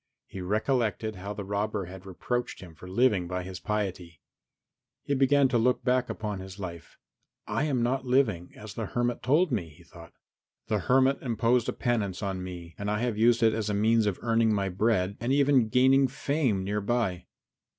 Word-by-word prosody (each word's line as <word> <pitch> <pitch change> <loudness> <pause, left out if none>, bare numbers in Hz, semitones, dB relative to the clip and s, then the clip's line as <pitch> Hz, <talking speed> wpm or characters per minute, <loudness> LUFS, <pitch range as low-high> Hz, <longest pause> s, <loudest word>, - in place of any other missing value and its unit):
He 95 - -8
recollected 110 +1 -1
how 100 +3 -6
the 100 - -5
robber 100 0 -2
had 95 +2 -11
reproached 120 +6 -3
him 90 -3 -11
for 90 - -12
living 100 -3 +2
by 90 0 -3
his 90 0 -7
piety. 95 -7 -3 0.8
He 140 - -1
began 140 +1 +4
to 120 -3 +2
look 125 +2 +1
back 125 -1 +1
upon 105 -3 -4
his 95 0 -9
life. 85 -4 -8 0.5
"I 150 - -1
am 130 -6 0
not 130 +2 0
living 125 -9 +1
as 105 0 -9
the 115 -3 -4
hermit 120 +2 -1
told 155 +6 +2
me," 95 -9 -2
he 85 +3 -18
thought. 85 -1 -14 0.6
"The 105 - +1
hermit 130 +7 +3
imposed 120 0 +1
a - - -1
penance 110 -5 -1
on 95 -2 -2
me 85 -2 -8
and 100 0 -2
I 105 - 0
have 120 -3 -1
used 115 +2 +3
it 110 -1 +5
as 110 -1 -2
a 105 - 0
means 110 +1 +3
of 100 - -1
earning 115 -1 +2
my 100 -1 0
bread 100 0 0
and 120 +3 -2
even 140 -4 +3
gaining 130 +3 +4
fame 130 -7 -1
thereby. 105 -3 -1
110 Hz, 190 wpm, -28 LUFS, 95-125 Hz, 0.8 s, it